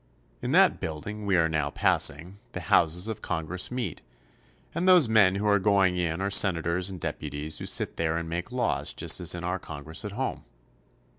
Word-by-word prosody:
In -, -, -3 dB
that -, -, +4 dB
building 100 Hz, +7 st, -6 dB
we 95 Hz, -2 st, +3 dB
are 80 Hz, -1 st, +3 dB
now 75 Hz, -3 st, -1 dB
passing 85 Hz, +6 st, 0 dB
the -, -, -4 dB
houses 85 Hz, +4 st, +2 dB
of 110 Hz, -3 st, -5 dB
Con 80 Hz, -2 st, -3 dB
gress 90 Hz, +3 st, -2 dB
meet, 120 Hz, -9 st, -4 dB, 0.7 s
and 170 Hz, +3 st, -1 dB
those 180 Hz, -7 st, +6 dB
men 100 Hz, -4 st, +4 dB
who 100 Hz, +2 st, -2 dB
are 100 Hz, -1 st, +3 dB
going 95 Hz, -2 st, +2 dB
in 85 Hz, 0 st, -2 dB
are 100 Hz, -, -1 dB
senators 90 Hz, -1 st, +2 dB
and 95 Hz, -2 st, -6 dB
deputies 75 Hz, 0 st, -5 dB
who -, -, -5 dB
sit -, -, 0 dB
there 80 Hz, 0 st, 0 dB
and 85 Hz, 0 st, -4 dB
make 85 Hz, +7 st, -5 dB
laws 125 Hz, -2 st, -1 dB
just -, -, +2 dB
as 90 Hz, 0 st, +1 dB
in 85 Hz, -, -7 dB
our 90 Hz, +2 st, -2 dB
Congress 75 Hz, 0 st, -6 dB
at 105 Hz, -1 st, -6 dB
home. 130 Hz, +5 st, -4 dB
90 Hz, 200 wpm, -27 LUFS, 80-105 Hz, 0.7 s, those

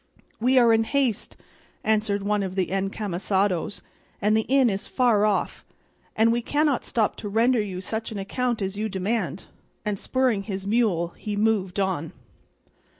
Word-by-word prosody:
"We 255 Hz, +3 st, +3 dB
are 235 Hz, -2 st, +6 dB
in 225 Hz, 0 st, +3 dB
haste," 265 Hz, -5 st, -1 dB, 0.5 s
answered 210 Hz, -2 st, +1 dB
one 210 Hz, 0 st, +1 dB
of 190 Hz, -1 st, -4 dB
the 185 Hz, -2 st, 0 dB
encamisados, 195 Hz, -1 st, -1 dB, 0.4 s
"and 210 Hz, +1 st, +2 dB
the 220 Hz, -, +1 dB
inn 270 Hz, -1 st, +5 dB
is 200 Hz, -3 st, -2 dB
far 225 Hz, -5 st, +3 dB
off, 205 Hz, -, -1 dB, 0.5 s
and 225 Hz, +1 st, +4 dB
we 240 Hz, +1 st, +1 dB
cannot 290 Hz, +2 st, +1 dB
stop 220 Hz, -3 st, 0 dB
to 205 Hz, -, -5 dB
render 230 Hz, +3 st, +3 dB
you 190 Hz, -3 st, -5 dB
such 220 Hz, +4 st, -4 dB
an 215 Hz, -, -5 dB
account 230 Hz, +3 st, -1 dB
as 190 Hz, +1 st, -3 dB
you 215 Hz, +2 st, -2 dB
demand;" 195 Hz, -3 st, -2 dB, 0.4 s
and 205 Hz, -2 st, -1 dB
spurring 255 Hz, -6 st, +1 dB
his 195 Hz, -1 st, -5 dB
mule 200 Hz, -6 st, +1 dB
he 205 Hz, +4 st, -6 dB
moved 205 Hz, -3 st, +1 dB
on. 180 Hz, -5 st, -1 dB
210 Hz, 160 wpm, -25 LUFS, 195-230 Hz, 0.5 s, are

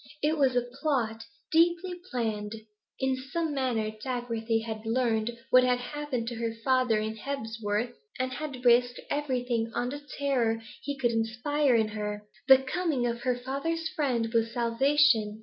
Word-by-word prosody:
It 305 Hz, +2 st, +3 dB
was 270 Hz, -4 st, +2 dB
a 245 Hz, -, +3 dB
plot, 245 Hz, -3 st, -2 dB, 0.3 s
deeply 345 Hz, +2 st, +3 dB, 0.2 s
planned. 220 Hz, -4 st, -2 dB, 0.4 s
In 265 Hz, -1 st, +1 dB, 0.2 s
some 330 Hz, -3 st, -1 dB
manner 240 Hz, -6 st, 0 dB
Dagworthy 230 Hz, -3 st, -1 dB
had 220 Hz, -1 st, -5 dB
learned 225 Hz, -1 st, +1 dB, 0.2 s
what 255 Hz, 0 st, +7 dB
had 250 Hz, 0 st, +3 dB
happened 250 Hz, -1 st, -4 dB
to 240 Hz, -, -5 dB
her 230 Hz, -1 st, -2 dB
father 255 Hz, -4 st, +3 dB
in 215 Hz, +1 st, -2 dB
Hebsworth, 225 Hz, -3 st, -3 dB, 0.2 s
and 255 Hz, 0 st, -1 dB
had 265 Hz, -2 st, -6 dB
risked 245 Hz, +1 st, +4 dB
everything 245 Hz, -5 st, -1 dB
on 245 Hz, -, 0 dB
the 290 Hz, +2 st, -6 dB, 0.2 s
terror 245 Hz, -6 st, +1 dB, 0.2 s
he 285 Hz, -1 st, -4 dB
could 245 Hz, -3 st, +1 dB
inspire 245 Hz, +5 st, +1 dB
in 220 Hz, -1 st, +2 dB
her. 210 Hz, -1 st, -4 dB, 0.2 s
The 265 Hz, 0 st, +8 dB
coming 285 Hz, -3 st, 0 dB
of 235 Hz, 0 st, -2 dB
her 250 Hz, -1 st, 0 dB
father's 320 Hz, +6 st, -2 dB
friend 245 Hz, -7 st, -1 dB
was 230 Hz, 0 st, +2 dB
salvation. 235 Hz, -2 st, +3 dB
245 Hz, 155 wpm, -29 LUFS, 225-275 Hz, 0.4 s, The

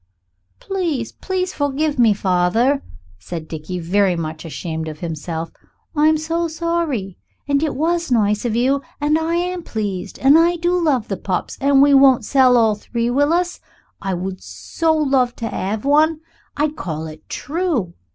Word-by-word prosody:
"Please, 330 Hz, -, -2 dB
please 370 Hz, -1 st, -3 dB
forgive 285 Hz, 0 st, -1 dB
me, 230 Hz, -3 st, +6 dB
father," 205 Hz, +8 st, +2 dB, 0.4 s
said 160 Hz, -, -7 dB
Dickie, 160 Hz, +3 st, -6 dB
very 185 Hz, +2 st, +1 dB
much 160 Hz, -1 st, -5 dB
ashamed 160 Hz, 0 st, -5 dB
of 155 Hz, -1 st, -7 dB
himself; 165 Hz, 0 st, -4 dB, 0.4 s
"I 300 Hz, +1 st, +4 dB
am 315 Hz, 0 st, +4 dB
so 330 Hz, +2 st, -1 dB
sorry. 320 Hz, -, -2 dB, 0.3 s
And 280 Hz, 0 st, +2 dB
it 310 Hz, -2 st, -1 dB
was 335 Hz, +1 st, 0 dB
nice 210 Hz, -3 st, +2 dB
of 235 Hz, -3 st, -1 dB
you 265 Hz, +4 st, +2 dB, 0.2 s
and 295 Hz, +1 st, +2 dB
I 325 Hz, +1 st, -1 dB
am 360 Hz, +1 st, -1 dB
pleased 205 Hz, -, -4 dB
and 280 Hz, +4 st, +6 dB
I 340 Hz, +1 st, +3 dB
do 345 Hz, +1 st, 0 dB
love 295 Hz, -10 st, +1 dB
the 195 Hz, -, -3 dB
pups 185 Hz, -1 st, -3 dB
and 275 Hz, 0 st, +5 dB
we 285 Hz, 0 st, +5 dB
won't 270 Hz, -2 st, +6 dB
sell 255 Hz, -3 st, +4 dB
all 225 Hz, -2 st, +4 dB
three, 235 Hz, +3 st, -2 dB
will 285 Hz, +4 st, +2 dB
us? 355 Hz, +1 st, 0 dB, 0.4 s
I 195 Hz, -1 st, -2 dB
would 185 Hz, +1 st, -5 dB
so 325 Hz, -1 st, -2 dB
like 265 Hz, -5 st, +1 dB
to 230 Hz, -, -4 dB
have 210 Hz, +4 st, -3 dB
one. 310 Hz, +2 st, +3 dB, 0.4 s
I'd 300 Hz, +1 st, 0 dB
call 160 Hz, -, -4 dB
it 155 Hz, -1 st, -11 dB
'True.' 295 Hz, -, -2 dB
265 Hz, 170 wpm, -20 LUFS, 190-315 Hz, 0.4 s, me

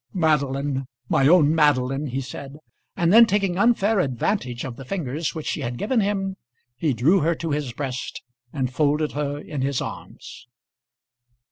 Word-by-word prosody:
"Madeline, 140 Hz, -5 st, 0 dB, 0.2 s
my 135 Hz, -, +3 dB
own 160 Hz, -2 st, +5 dB
Madeline," 145 Hz, -2 st, +2 dB
he 135 Hz, +1 st, -3 dB
said; 135 Hz, +2 st, -8 dB, 0.4 s
and 170 Hz, +1 st, +2 dB
then 230 Hz, +1 st, +8 dB
taking 195 Hz, -3 st, +1 dB
unfair 220 Hz, -2 st, +3 dB
advantage 130 Hz, -, -1 dB
of 125 Hz, -3 st, -6 dB
the 135 Hz, -, -9 dB
fingers 155 Hz, 0 st, -3 dB
which 155 Hz, -, -5 dB
she -, -, -2 dB
had 120 Hz, 0 st, -4 dB
given 235 Hz, -, 0 dB
him 195 Hz, -2 st, -1 dB, 0.4 s
he 145 Hz, +4 st, 0 dB
drew 140 Hz, -, +3 dB
her 165 Hz, +1 st, +1 dB
to 165 Hz, 0 st, -4 dB
his 145 Hz, -3 st, -2 dB
breast 130 Hz, 0 st, -5 dB, 0.3 s
and 130 Hz, -3 st, -2 dB
folded 150 Hz, +1 st, +1 dB
her 145 Hz, -1 st, -3 dB
in 145 Hz, -1 st, -5 dB
his 135 Hz, -1 st, 0 dB
arms. -, -, -8 dB
145 Hz, 160 wpm, -23 LUFS, 135-175 Hz, 0.4 s, then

